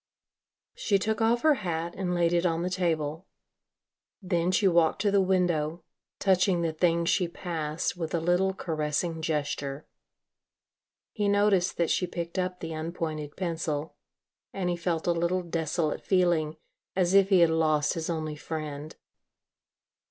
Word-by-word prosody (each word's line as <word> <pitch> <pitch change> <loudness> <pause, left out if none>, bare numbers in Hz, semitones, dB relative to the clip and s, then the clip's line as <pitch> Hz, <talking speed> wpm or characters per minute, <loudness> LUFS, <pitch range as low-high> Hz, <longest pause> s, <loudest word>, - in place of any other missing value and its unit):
She 220 - +1
took 220 +3 -1
off 235 +2 +2
her 310 -1 +6
hat 170 -2 -3
and 180 -2 -2
laid 170 0 +2
it 170 0 +2
on 165 -1 0
the 180 - -2
table. 165 -2 -1 0.9
Then 175 -2 0
she 195 +2 +3
walked 170 -3 +3
to 205 - +3
the 200 -1 +4
window, 175 -4 0 0.3
touching 185 -2 +2
the 165 -1 -1
things 170 +1 +1
she 180 0 +2
passed 165 -3 -3
with 165 -1 -3
a - - +1
little 175 +3 +2
caressing 160 -2 -2
gesture. 145 -3 -2 1.3
He 210 -2 -1
noticed 200 -2 +2
that 170 -1 +1
she 180 - +1
picked 170 +1 -4
up 180 0 -2
the 165 -1 -4
unpointed 155 -2 -4
pencil 160 -4 -3 0.6
and 180 -2 -2
he - - 0
felt 170 -1 -2
a 175 - +3
little 170 +2 0
desolate 160 -2 -1
feeling, 170 -5 +1 0.4
as 180 -1 +2
if 195 -1 +5
he 190 -3 +5
had 170 -1 +5
lost 155 -2 +2
his 165 -2 -4
only 155 -2 -3
friend. 150 -1 -6
170 Hz, 150 wpm, -28 LUFS, 160-185 Hz, 1.3 s, her